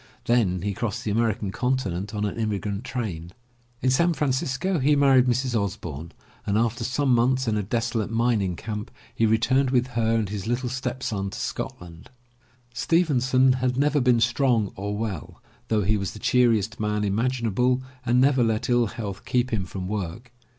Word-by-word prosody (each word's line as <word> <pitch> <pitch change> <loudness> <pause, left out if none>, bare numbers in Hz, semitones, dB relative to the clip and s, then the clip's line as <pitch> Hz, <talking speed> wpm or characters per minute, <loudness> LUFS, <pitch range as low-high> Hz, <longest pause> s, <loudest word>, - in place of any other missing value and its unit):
Then 100 -7 +2
he 100 0 -1
crossed 105 0 -3
the 105 - -2
American 110 -2 0
continent 105 -7 -1
on 105 0 -1
an 100 - -3
immigrant 105 -1 -2
train. 90 -10 -5 0.5
In 130 - +3
San 170 +6 +3
Francisco 145 +5 0
he 145 +3 +3
married 135 -3 +5
Mrs. 125 +1 0
Osbourne 85 -7 -3 0.3
and 100 0 0
after 115 +1 0
some 130 +2 +1
months 130 +2 +2
in 110 - +1
a 105 - 0
desolate 115 +1 -1
mining 115 -5 +1
camp, 105 +2 -5 0.2
he 115 - +2
returned 125 +5 +2
with 125 0 +1
her 115 -2 +1
and 110 -3 0
his 100 -1 -5
little 120 +1 -1
stepson 125 -6 -3
to 95 - -8
Scotland. 85 -1 -6 0.6
Stevenson 130 -5 +3
had 125 0 -1
never 145 +1 +2
been 125 -2 +4
strong 115 -2 +2
or 100 +1 -4
well, 105 -7 -5 0.3
though 110 -2 +1
he 105 +3 +2
was 100 -1 -3
the - - -9
cheeriest 115 -2 +2
man 105 0 -1
imaginable 125 +3 +1 0.2
and 125 0 +2
never 135 -1 +4
let 110 0 0
ill 120 -1 +3
health 100 -2 -6
keep 125 -1 0
him 100 -4 0
from 90 0 -6
work. 105 +4 -5
115 Hz, 170 wpm, -25 LUFS, 105-125 Hz, 0.6 s, married